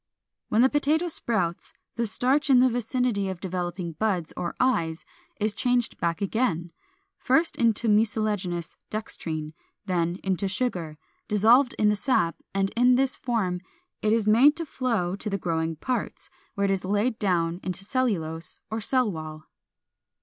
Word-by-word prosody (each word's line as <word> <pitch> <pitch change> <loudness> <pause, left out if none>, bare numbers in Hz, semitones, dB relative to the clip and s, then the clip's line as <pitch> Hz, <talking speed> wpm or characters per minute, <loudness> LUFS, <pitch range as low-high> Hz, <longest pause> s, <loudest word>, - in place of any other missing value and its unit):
When 225 +3 +4
the 260 - +5
potato 305 +4 +1
sprouts, 185 - -1 0.2
the 235 0 0
starch 265 +7 +1
in 260 -2 +7
the 255 +1 +5
vicinity 240 -4 -1
of 190 -2 -5
developing 175 -1 -3
buds 180 -1 -1
or 175 - -4
eyes 170 -11 0 0.3
is 215 0 +1
changed 245 +2 0
back 170 +4 -1
again, 180 -6 -1 0.5
first 320 +6 +2
into 230 -1 +2
mucilaginous 210 -5 0
dextrine, 160 -8 -4 0.3
then 175 -2 0
into 190 0 0
sugar, 185 -7 -2 0.3
dissolved 230 +6 +4
in 210 - +3
the 210 - +2
sap, 200 -7 +1 0.2
and 195 0 0
in 245 +1 +4
this 265 +1 +1
form 195 -8 -1 0.4
it 215 - +1
is 225 -1 +2
made 255 +8 +6
to 330 - -3
flow 230 - -1
to 210 - -4
the 200 - -1
growing 165 -3 -1
parts, 250 +10 -4 0.2
where 200 -1 +1
it 195 - +1
is 195 -1 -1
laid 210 +5 0
down 175 -4 0
into 185 +1 -4
cellulose 185 -10 -1
or 220 +1 -2
cell 250 0 +1
wall. 155 -2 -7
210 Hz, 155 wpm, -26 LUFS, 175-245 Hz, 0.5 s, in